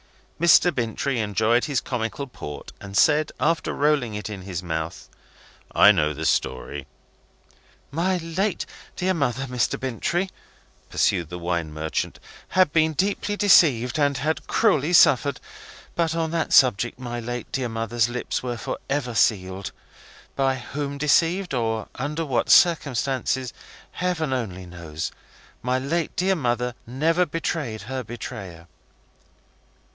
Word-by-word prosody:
Mr. 170 +1 +6
Bintrey 120 +1 -1
enjoyed 110 +3 +2
his 140 -5 0
comical 120 +2 -3
port, 75 - -8
and 100 0 -5
said, 155 +3 +4
after 165 +2 +1
rolling 140 -7 +1
it 105 - -4
in 105 -3 -6
his 90 -2 -5
mouth: 80 -1 -4 0.7
"I 105 - +8
know 75 -6 +1
the 80 +2 -4
story." 70 +1 -1 1.0
"My 180 +5 +1
late 175 +4 -2 0.3
dear 185 +1 0
mother, 135 -5 -1
Mr. 125 -3 -1
Bintrey," 170 - -1 0.6
pursued 85 -3 +1
the 90 - -6
wine 85 -2 -2
merchant, 80 +1 -3 0.3
"had 185 -5 +3
been 160 -1 +3
deeply 200 +5 -1
deceived, 150 - +5
and 140 -1 +2
had 155 +5 -2
cruelly 175 -8 +2
suffered. 140 -3 +5 0.5
But 165 -2 0
on 165 -1 -1
that 165 -1 -1
subject 120 -2 +4
my 120 -1 -5
late 120 +1 -5
dear 130 -3 -1
mother's 115 +1 0
lips 125 +1 -3
were 120 -2 -3
for - - -4
ever 135 -3 -1
sealed. 95 -4 +1 0.6
By 135 -1 +2
whom 140 +3 -5
deceived, 165 +4 +2
or 115 -3 -1
under 150 +5 -3
what 130 -5 0
circumstances, 130 -5 +3 0.4
Heaven 165 -6 -1
only 95 -8 -4
knows. 85 -3 -6 0.5
My 125 +1 0
late 150 +5 -2
dear 190 +2 +2
mother 125 -6 -1
never 165 +8 +1
betrayed 145 -8 -3
her 130 +3 -4
betrayer." 100 -7 -8
130 Hz, 135 wpm, -24 LUFS, 110-160 Hz, 1.0 s, I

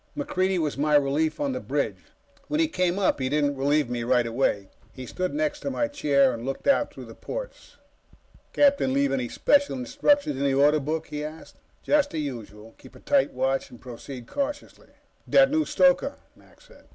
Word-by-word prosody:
MacReidie 190 -11 0
was 150 -4 -2
my 150 +1 +2
relief 145 +2 +1
on 285 -2 -1
the 255 - -3
bridge. - - -3 0.4
When 300 - -1
he 320 - +3
came 185 - 0
up, 195 -7 +1
he 130 -1 -1
didn't 145 0 +1
relieve 145 +1 +1
me 120 0 -3
right 120 0 +2
away. 115 -5 -1 0.2
He 130 - -9
stood 185 +9 -3
next 300 0 -1
to 280 - -4
my 290 +2 -1
chair 140 - +2
and 115 0 -7
looked 135 +1 -5
out 280 - +3
through - - -10
the - - -11
ports. - - -8 0.7
"Captain 280 - +3
leave 140 0 +2
any 125 -3 -2
special 285 -1 +2
instructions 285 - +1
in 140 - -2
the 135 -1 +1
Order 145 +2 +4
Book?" 155 +3 -3
he 150 0 -4
asked. 155 +1 -9 0.3
"Just 295 -1 +2
the 165 - -6
usual. 115 -6 -7
Keep - - -16
a - - -13
tight 280 -2 +2
watch 135 +1 -1
and 120 - -14
proceed 125 0 -9
cautiously." 285 - -5 0.4
"That 270 0 +5
new 310 0 +1
stoker," - - +2 0.2
Mac - - -23
said. - - -20
150 Hz, 195 wpm, -25 LUFS, -, 0.7 s, That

